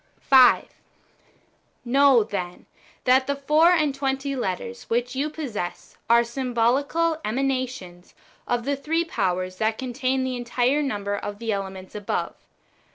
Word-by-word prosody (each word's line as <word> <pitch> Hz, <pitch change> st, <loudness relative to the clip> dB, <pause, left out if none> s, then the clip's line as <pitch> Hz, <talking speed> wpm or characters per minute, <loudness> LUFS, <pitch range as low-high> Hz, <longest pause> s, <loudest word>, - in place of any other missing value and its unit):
5. 260 Hz, -2 st, +6 dB, 1.2 s
Know, 270 Hz, -1 st, +5 dB
then, 180 Hz, -4 st, -5 dB, 0.4 s
that 260 Hz, +1 st, +4 dB
the 280 Hz, -, 0 dB
four 300 Hz, +4 st, +4 dB
and 305 Hz, -5 st, +2 dB
tw^enty 270 Hz, 0 st, -2 dB
letters 235 Hz, +1 st, -4 dB
which 245 Hz, +2 st, -1 dB
you 285 Hz, +3 st, -1 dB
possess 250 Hz, -, -6 dB
are 235 Hz, 0 st, +6 dB
symbolical 265 Hz, +7 st, 0 dB
emanations 255 Hz, -7 st, -3 dB, 0.3 s
of 240 Hz, -1 st, -1 dB
the 285 Hz, +1 st, 0 dB
three 325 Hz, +5 st, -1 dB
powers 185 Hz, -, -2 dB
that 220 Hz, +1 st, 0 dB
contain 260 Hz, +1 st, -1 dB
the 260 Hz, -1 st, -2 dB
entire 245 Hz, +4 st, 0 dB
number 205 Hz, -7 st, -2 dB
of 205 Hz, 0 st, -5 dB
the 225 Hz, 0 st, -3 dB
elements 190 Hz, -2 st, -5 dB
above. 205 Hz, -1 st, -3 dB
250 Hz, 130 wpm, -24 LUFS, 215-275 Hz, 1.2 s, 5